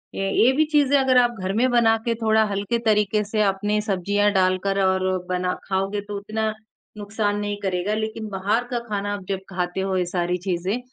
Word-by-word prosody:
ये 195 0 -1
ये 250 - +6
भी 310 - +4
चीज़ें 290 -2 +3
अगर 260 -1 +3
आप 240 -1 +3
घर 185 +1 -2
में 245 +5 +2
बनाकर 230 -1 +2
थोड़ा 220 0 +3
हल्के 200 +4 -1
तरीक़े 210 -1 +2
से 215 +1 -1
अपनी 205 +2 0
सब्जियाँ 205 0 +1
डालकर 190 +1 +1
और 190 0 +1 0.2
बना 180 0 0
खाओगे 195 +1 -1
तो 205 0 -6
उतना 215 +2 -2 0.4
नुकसान 205 0 -2
नहीं 205 0 -3
करेगा। 190 +1 -1
लेकिन 220 0 -4
बाहर 205 +4 0
का 240 - 0
खाना 205 0 -2
आप 200 -2 -6
जब 195 -1 -1
खाते 180 -1 -3
हो 190 -1 -1
ये 180 - +1
सारी 175 0 -1
चीज़ें 185 +5 -1
205 Hz, 190 wpm, -23 LUFS, 190-220 Hz, 0.4 s, ये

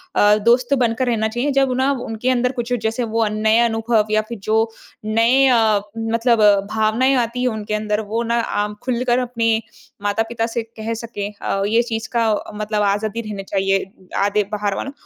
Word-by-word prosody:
अ, 205 0 +5
दोस्त 245 +3 +3
बनकर 250 -1 +1
रहना 220 -2 +1
चाहिए। 240 +6 -1
जब 270 -1 +2
ना 265 +2 +2
उनके 225 +3 -2
अंदर 250 0 +2
कुछ 245 -1 -3
जैसे 225 +2 -1
वो 225 0 0
अ, - - 0
नए 215 +1 +2
अनुभव 225 -1 +1
या 215 0 +3
फिर 235 - -5
जो 220 +3 +1 0.4
नए 230 +5 +3
अ, 220 -5 +3 0.2
मतलब 230 +1 +1 0.3
भावनाएँ 220 +5 +2
आती 245 0 -1
हैं 255 - +2
उनके 215 -1 -4
अंदर, 210 0 -1
वो 220 +2 -2
ना 235 0 0
आम 210 -2 -2
खुलकर 250 0 +1
अपने 235 -2 0 0.5
माता-पिता 225 +3 -1
से 230 0 -3
कह 225 0 -6
सकें। 225 -3 -5
अ, 195 - -1
ये 225 +3 +3
चीज़ 225 -2 -4
का 225 -2 +3 0.2
मतलब 210 0 -2
आज़ादी 205 +3 0
रहना 210 -3 -6
चाहिए। 195 0 0 0.4
आधे 205 +1 +2
बाहर 205 -1 -1
वालों 275 - -4
225 Hz, 185 wpm, -20 LUFS, 215-240 Hz, 0.5 s, अ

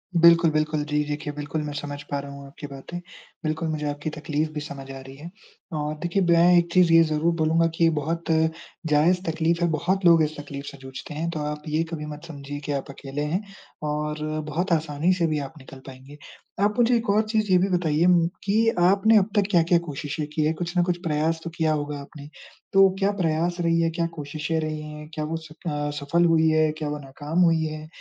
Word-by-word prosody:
बिल्कुल, 170 -1 +6
बिल्कुल 155 0 0
जी 150 0 +1
देखिए 145 0 -4
बिल्कुल 150 +1 -3
मैं 150 -1 -5
समझ 145 0 -5
पा 140 - 0
रहा 140 0 -7
हूँ 140 0 -10
आपकी 145 +1 -9
बातें। 140 +5 -8 0.4
बिल्कुल 155 +1 -1
मुझे 155 -1 -2
आपकी 145 +1 -4
तकलीफ़ 155 0 -2
भी 150 - -3
समझ 140 -2 -8
आ 135 - -7
रही 135 0 -11
है। 150 +5 -9 0.5
और 150 0 -2
देखिए 175 +3 +1
मैं 170 +1 +6
एक 170 0 +2
चीज़ 180 -2 +5
ये 165 - +8
ज़रूर 155 +1 +1
बोलूँगा 165 +1 +2
कि 165 0 +4
बहुत 165 +3 -2 0.6
जायज़ 160 +4 +3
तकलीफ़ 165 +1 0
है - - +4
बहुत 180 +5 0
लोग 165 -2 +7
इस 155 0 -3
तकलीफ़ 140 -1 -7
से 140 - -8
जूझते 130 +2 -8
हैं। 160 +3 -2
तो 165 -2 -4
आप 150 0 -4
ये 155 +2 +1
कभी 155 -2 -4
मत 150 +1 -8
समझिए 145 -2 -7
कि - - -2
आप 140 -1 -3
अकेले 140 +1 -6
हैं 185 - +1 0.5
और 150 0 -2 0.3
बहुत 175 +6 -2
आसानी 155 +2 +1
से 175 -2 +1
भी 155 -1 0
आप 140 0 -6
निकल 135 0 -12
पाएँगे। 135 +2 -12 0.5
आप 210 +2 0
मुझे 240 0 +4
एक 235 -1 -1
और 205 +2 +4
चीज़ 215 -2 +1
ये 185 - +7
भी 185 +2 +2
बताइए 170 -3 +2
उम, 175 -2 +5 0.2
कि 220 +3 +3
आपने 200 +5 +5
अब 200 0 +3
तक 205 -2 +3
क्या-क्या 170 -1 +4
कोशिशें 150 +1 -4
की 155 - +1
है 155 - +2
कुछ 175 +2 -4
न 175 - +5
कुछ 175 0 0
प्रयास 160 0 0
तो 170 - -4
किया 160 -1 +2
होगा 145 -1 -3
आपने। 145 0 -11 0.5
तो 195 0 +7
क्या 200 0 +2
प्रयास 170 +1 0
रही 165 0 +2
हैं, 165 0 +1
क्या 170 - +1
कोशिशें 150 +2 -3
रही 155 -1 -3
हैं? 150 0 -8
क्या 155 - -3
वो 160 +2 -3
स 160 -1 -11 0.2
अ, 145 -2 -1
सफ़ल 170 +5 +2
हुई 160 -1 +4
हैं? 155 0 +3
क्या 150 -2 -3
वो 150 - -3
नाकाम 145 +4 -4
हुई 165 -1 +3
हैं? 155 0 -6
155 Hz, 225 wpm, -25 LUFS, 150-170 Hz, 0.6 s, ये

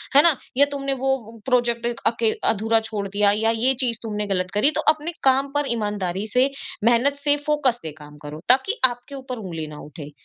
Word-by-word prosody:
है 285 - +9
ना? 335 -3 +6 0.2
या 285 - +6
तुमने 275 -1 -2
वो 230 -5 -2
प्रोजेक्ट 240 -2 +1 0.2
अके 230 -1 +2 0.2
अधूरा 225 +2 +1
छोड़ 215 -2 -4
दिया 200 +1 +2
या 220 +2 +1
ये 250 +4 +3
चीज़ 240 -3 -1
तुमने 210 -2 -3
गलत 185 -2 -1
करी 245 +9 +4
तो - - +1
अपने 310 +3 -6
काम 270 +1 +3
पर 290 0 +1
ईमानदारी 205 -3 -3
से, 250 +5 +2 0.4
मेहनत 240 +4 +3
से, 290 0 +4
फोकस 275 -5 +1
से 160 - -5
काम 150 0 -13
करो 150 +1 -8
ताकि 270 - +3
आपके 245 +2 -3
ऊपर 260 -2 -7
ऊँगली 165 -6 -6
ना 150 -1 -10
उठे। 150 -1 -10
230 Hz, 200 wpm, -22 LUFS, 205-270 Hz, 0.4 s, है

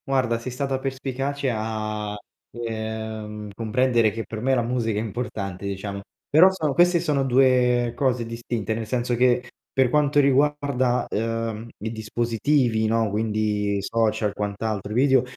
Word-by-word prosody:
Guarda, 130 -4 +1
sei 125 +2 -6
stata 135 +1 -2
perspicace 135 +1 -2
a, 110 -1 -3 0.4
ehm, 110 -2 -5
comprendere 115 +1 +2
che 115 +2 -4
per 110 -1 -6
me 130 +2 +2
la 120 - +1
musica 115 -3 -1
è - - -1
importante 105 -4 -4
diciamo. 100 0 -4 0.3
Però 165 +6 +7
sono 155 -7 -1
queste 175 +2 +4
sono 145 -4 +1
2 125 -2 +3
cose 125 -4 0
distinte, 115 -1 -3
nel 110 0 -4
senso 120 +1 0
che, 125 0 +2 0.2
per 130 -2 +3
quanto 145 +1 +3
riguarda, 140 -2 +2
uhm, 115 0 -2 0.2
i 110 - -2
dispositivi, 115 +1 0
no, 115 0 +1
quindi, 105 -1 0
social 110 0 0
quant'altro 105 0 -3
e - - -3
video, 130 0 +4
115 Hz, 145 wpm, -24 LUFS, 110-130 Hz, 0.4 s, Però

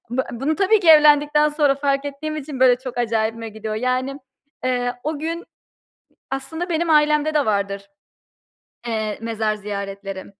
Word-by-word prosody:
bu 260 +2 0
bunu 275 +6 -1
tabii 405 +2 +3
ki 350 - +1
evlendikten 300 -1 +6
sonra 295 -2 +2
fark 275 0 0
ettiğim 295 +2 -5
için, 280 -3 -6
böyle, 250 -1 +6
çok 255 -1 -8
acayibime 225 -1 -1
gidiyor. 215 0 -6
Yani, 255 +4 -1 0.5
eee, 245 -1 0
o 305 0 -2
gün 330 +3 -4 0.9
aslında 320 +6 -4
benim 335 0 0
ailemde 300 0 +3
de 295 -2 +2
vardır, 200 -1 -2 1.0
eee, 220 -2 -2
mezar 220 -1 -1
ziyaretleri 200 -1 -6
265 Hz, 145 wpm, -21 LUFS, 220-300 Hz, 1.0 s, evlendikten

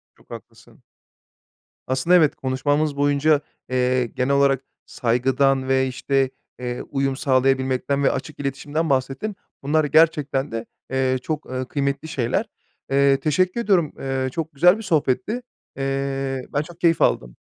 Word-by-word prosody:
Çok - - -26
haklısın. - - -13 1.0
Aslında, 130 +7 +2
evet, 155 -5 +4
konuşmamız 145 +3 0
boyunca, 145 +1 +3 0.3
eee, 125 0 +1
genel 125 +3 -1
olarak 140 -1 +3 0.2
saygıdan 130 +3 +1
ve, 130 0 +2
işte, 135 +1 0 0.3
eee, 125 -1 -4
uyum 135 -1 0
sağlayabilmekten 130 +1 +1
ve - - +4
açık 145 +3 -6
iletişimden 145 +3 -2
bahsettin. 135 +10 -1 0.3
Bunlar 155 +3 +2
gerçekten 150 -3 +2
de, 115 0 -4 0.3
eee, 130 -1 +1
çok, 155 +2 -4
ııı, 130 0 -4
kıymetli 140 +2 -2
şeyler. 130 -7 -1 0.5
Eee, 140 0 +4
teşekkür 180 +10 +1
ediyorum. 180 -9 +2
Eee, 135 -1 -2
çok 160 +2 -4
güzel 180 +7 +5
bir 225 - -8
sohbetti. 185 - 0 0.4
Eee, 135 -1 -2
ben 145 - +2
çok 170 +2 -11
keyif 165 -2 +2
aldım. - - +1
135 Hz, 135 wpm, -22 LUFS, 130-155 Hz, 1.0 s, güzel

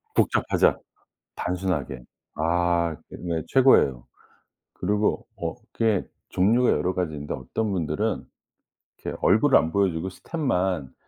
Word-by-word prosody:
복잡하자. - - +3 0.6
단순하게. 90 -8 -2 0.3
아 85 0 +1
그 - - -9
네 85 -3 -2
최고예요. 70 - +4 0.7
그리고 105 +1 0
어 - - -3 0.2
그게 110 -4 +1 0.3
종류가 115 +7 +3
여러 90 +1 0
가지 90 -4 -2
있는데 75 0 -5
어떤 100 - -3
분들은 90 +5 -1 0.8
이렇게 - - -4
얼굴을 - - +5
안 80 +1 +1
보여주고 95 -3 0
스텝만 95 - -2
90 Hz, 270 characters per minute, -25 LUFS, 80-100 Hz, 0.8 s, 얼굴을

